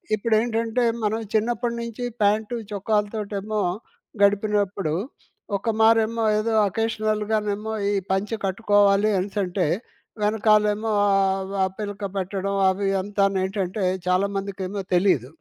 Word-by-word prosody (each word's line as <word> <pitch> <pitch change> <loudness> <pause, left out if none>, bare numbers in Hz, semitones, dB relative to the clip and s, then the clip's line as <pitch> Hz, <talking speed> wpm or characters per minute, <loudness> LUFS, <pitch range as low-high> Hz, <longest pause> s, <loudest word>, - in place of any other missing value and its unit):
ఇపుడేంటంటే 225 +2 0 0.2
మనం 215 +2 0
చిన్నప్పడినుంచి 235 +1 -1 0.2
ప్యాంట్ 210 +3 +2 0.2
చొక్కాలతోటేమో 210 0 -2 0.6
గడిపినప్పుడు. 200 -4 +1 0.6
ఒక 210 +4 -3
మారేమో 225 0 +3 0.2
ఏదో 225 +1 -1 0.2
అకేషనల్‌గానేమో 215 0 -1 0.2
ఈ - - 0 0.2
పంచె 200 +4 0
కట్టుకోవాలి 205 +1 +3
అనేసంటే 190 -1 -1 0.6
వెనకాలేమో 210 0 +2 0.2
ఆహ్, 195 -1 +1
ఆ - - +4
పిలక 205 -1 -5
పెట్టడం 195 +1 -2
అవి 195 +1 -1
అంతానేంటంటే, 195 0 -1 0.2
చాలామందికేమో 195 +1 -1
తెలీదు. 175 - +2
205 Hz, 90 wpm, -24 LUFS, 195-220 Hz, 0.6 s, ఆ